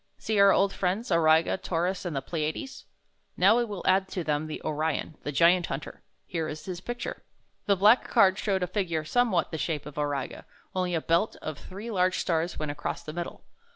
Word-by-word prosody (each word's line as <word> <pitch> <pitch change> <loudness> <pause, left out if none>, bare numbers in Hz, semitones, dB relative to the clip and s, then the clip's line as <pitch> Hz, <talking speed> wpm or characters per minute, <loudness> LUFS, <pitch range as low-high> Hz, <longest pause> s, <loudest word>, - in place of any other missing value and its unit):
See 220 -2 -1
our 200 0 +8
old 195 0 +3
friends, 195 +4 -1
Auriga, 160 0 +4
Taurus, 180 +1 -2
and 170 -4 -3
the 135 - -2
Pleiades? 160 - -4 0.5
Now - - +6
we 240 - +3
will 205 -5 -6
add 190 +1 +3
to 185 -2 -4
them 150 0 -1
O 155 0 -4
rf 155 +1 0
on, 160 - -8
the 145 - -4
Giant 170 +4 +4
Hunter. 135 +2 -6 0.2
Here 165 -2 -3
is 155 0 -7
his 180 -2 -5
picture." 240 +4 -5 0.5
The 200 - +4
black 210 +6 +5
card 195 -5 +4
showed 190 -3 0
a - - +2
figure 175 -4 -2
somewhat 225 -2 +1
the 160 - -4
shape 155 -2 -2
of 150 0 -7
Auriga, 145 -2 -3 0.3
only 180 -2 0
a 160 - 0
belt 170 +8 +1
of 155 -2 -5
three 205 +5 -8
large 185 -2 +2
stars 170 0 -1
went 155 -1 -2
across 145 0 -4
the 155 - -7
middle. 175 0 -6
175 Hz, 205 wpm, -28 LUFS, 155-195 Hz, 0.5 s, our